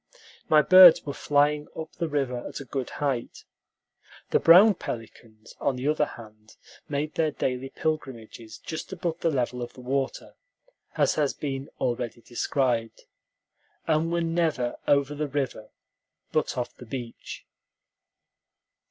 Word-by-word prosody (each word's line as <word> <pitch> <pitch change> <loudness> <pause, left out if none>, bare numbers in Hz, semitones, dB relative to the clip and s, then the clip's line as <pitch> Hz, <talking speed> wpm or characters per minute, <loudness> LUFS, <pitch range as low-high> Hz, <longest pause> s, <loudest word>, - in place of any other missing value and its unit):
My 155 -1 +6
birds 185 -2 +9
were 140 - -4
flying 145 +1 +1
up 160 0 -6
the 170 - -3
river 135 -4 -1
at - - -7
a 140 - -8
good 130 0 -4
height. 135 -5 -3 0.9
The - - +4
brown 190 +6 +8
pelicans, 115 - -9
on 135 - 0
the 125 +3 -3
other 150 -1 +2
hand, 110 -1 -14 0.3
made 150 +1 -2
their 160 -1 +1
daily 130 -2 -3
pilgrimages 120 -8 -5
just 160 0 -7
above 175 -3 -3
the 165 - +1
level 125 -3 -1
of 120 - -6
the 130 - -12
water, 135 +2 -3 0.6
as - - +3
has 145 -3 0
been 135 -1 -4
already 120 -1 -2
described, 120 -1 -1 0.8
and 160 +1 +1
were 170 0 0
never 165 -7 0
over 140 0 +3
the 150 +1 -3
river, 135 -6 -3 0.6
but - - -1
off 125 - -3
the 125 - -12
beach. 120 -1 -7
140 Hz, 140 wpm, -26 LUFS, 125-155 Hz, 0.9 s, birds